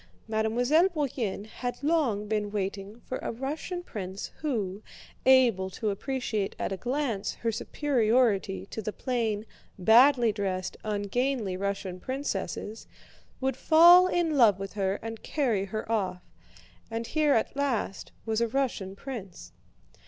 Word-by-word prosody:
Mademoiselle 245 +11 +3
Bourienne 260 - -2
had 245 +4 -6
long 275 -10 +1
been 210 -1 -1
waiting 200 +1 -4
for 255 - -5
a - - -3
Russian 300 +8 -4
prince 195 - -6
who, 215 -10 -2 0.5
able 240 -8 +5
to 210 +2 -2
appreciate 215 -2 -2
at - - -2
a - - -1
glance 245 -4 -2
her 230 - -1
superiority 225 -6 +1
to 220 - -4
the 215 - -3
plain, 225 -4 -2 0.3
badly 235 +4 +6
dressed, 190 -3 -3
ungainly 215 +1 -1
Russian 195 -1 -3
princesses, 260 -3 -4 0.5
would 265 0 0
fall 345 +3 +7
in 345 -4 +1
love 225 -8 +6
with 195 0 -6
her 195 -1 0
and 225 0 -6
carry 235 -10 0
her 215 +3 -5
off; 185 -5 -1 0.7
and 230 +1 -3
here 300 +1 +2
at 225 - 0
last 265 -8 -2
was 220 0 0
a 235 - +2
Russian 225 -7 -2
prince. 195 - -8
225 Hz, 135 wpm, -28 LUFS, 200-265 Hz, 0.7 s, fall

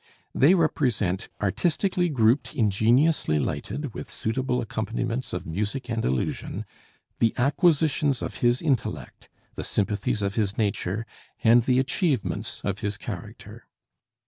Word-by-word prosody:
They 155 +8 +5
represent 120 - 0
artistically 175 - +1
grouped, 125 +1 +2
ingeniously 115 - +3
lighted, 135 - -3
with - - -7
suitable 125 +2 -1
acompaniments 115 +2 -3
of - - -4
music 105 +9 -3
and 115 -1 -1
illusion 65 0 -2 0.5
the 115 -1 +2
acquisitions 145 0 +2
of - - -5
his 120 +3 +2
intellect, 140 -8 -2 0.2
the - - -5
sympathies 105 +2 -1
of 100 0 0
his 105 -2 -1
nature, 105 0 -1 0.4
and 120 +1 +6
the 125 +2 +2
achievements 135 - -1
of 100 0 -2
his 105 -2 -2
character. - - -8
120 Hz, 120 wpm, -26 LUFS, 105-140 Hz, 0.5 s, and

